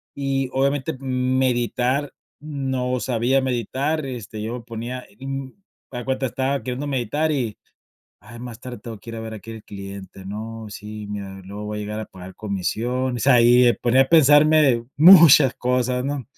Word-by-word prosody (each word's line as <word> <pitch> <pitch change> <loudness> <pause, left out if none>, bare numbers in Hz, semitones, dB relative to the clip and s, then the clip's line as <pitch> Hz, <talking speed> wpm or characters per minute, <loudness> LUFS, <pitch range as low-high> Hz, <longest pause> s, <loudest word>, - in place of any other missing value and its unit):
y 135 -1 -1
obviamente, 140 +3 0
m 130 -1 -1
meditar, 125 +2 0 0.3
no 130 -4 -2
sabía 125 +2 +1
meditar, 130 +5 -2
este, 115 -5 -7
yo 110 +3 -4
me 125 - -7
ponía, 120 +2 -6
mm, 135 0 -5 0.4
haz 125 - -5
de 120 - -8
cuenta 135 0 -1
estaba 135 +3 -2
queriendo 130 +3 -4
meditar 140 +4 -1
y: 120 -7 -2 0.6
"Ay, 120 - -12
más 120 -1 -8
tarde 125 -1 -7
tengo 115 -3 -8
que 115 - -12
ir 115 - -6
a - - -5
ver 110 0 -7
a 110 - -6
aquel 115 +3 -10
al 110 - -15
cliente, 100 -1 -9
no 110 +2 -7
sí, 105 +1 -8
mira, 100 -2 -7
luego 100 +2 -8
voy 105 0 -4
a - - -4
llegar 105 +1 -5
a 110 - -5
pagar 95 0 -12
comisión", 120 +6 -2
o - - -5
sea, 135 +3 +4
ahí 120 +1 +6
y - - +5
me 120 - +5
ponía 125 +3 +2
a - - -8
pensarme 150 -5 +5
muchas 155 -5 +8
cosas, 125 0 0
¿no? 140 -1 -3
125 Hz, 190 wpm, -22 LUFS, 110-135 Hz, 0.6 s, muchas